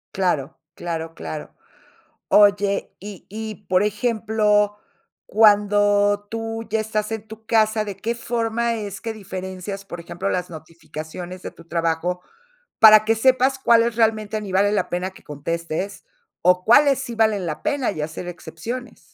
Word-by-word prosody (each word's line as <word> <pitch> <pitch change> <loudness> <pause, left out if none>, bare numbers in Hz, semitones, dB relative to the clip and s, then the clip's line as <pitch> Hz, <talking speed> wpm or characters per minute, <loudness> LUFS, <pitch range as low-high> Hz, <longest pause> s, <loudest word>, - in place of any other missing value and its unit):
Claro, 175 -8 -1
claro, 165 -1 -5
claro. 80 -1 -7 0.7
Oye, 205 -1 +3
y 200 -2 -10
y 215 0 -7
por 185 +1 +3
ejemplo, 210 -1 +1 0.5
cuando 205 -1 +4
tú 225 0 -4
ya 220 0 0
estás 215 0 -2
en 220 -1 -5
tu 220 0 -12
casa, 220 -1 +2
¿de 200 -2 -6
qué 230 +4 -2
forma 235 0 -1
es 205 -3 -6
que 225 -1 -4
diferencias, 190 -1 -7
por 175 -3 -8
ejemplo, 175 +3 -4
las 180 -2 -2
notificaciones 165 +2 -9
de - - -6
tu 170 - -17
trabajo, 170 +2 -1 0.6
para 215 -1 +9
que 225 - +3
sepas 260 +3 +3
cuáles 235 -2 +4
realmente 220 -1 +1
ni 200 -2 -7
vale 200 +2 +3
la 210 - 0
pena 180 +2 -2
que 190 - -18
contestes, 165 +6 -4 0.4
o, 180 +1 +4
cuáles 275 +3 +6
sí 245 -3 -5
valen 215 -4 +2
la 155 -3 -4
pena, 285 -6 0
y 155 - -5
hacer 160 +3 -5
excepciones? 220 +9 -7
205 Hz, 150 wpm, -22 LUFS, 180-220 Hz, 0.7 s, para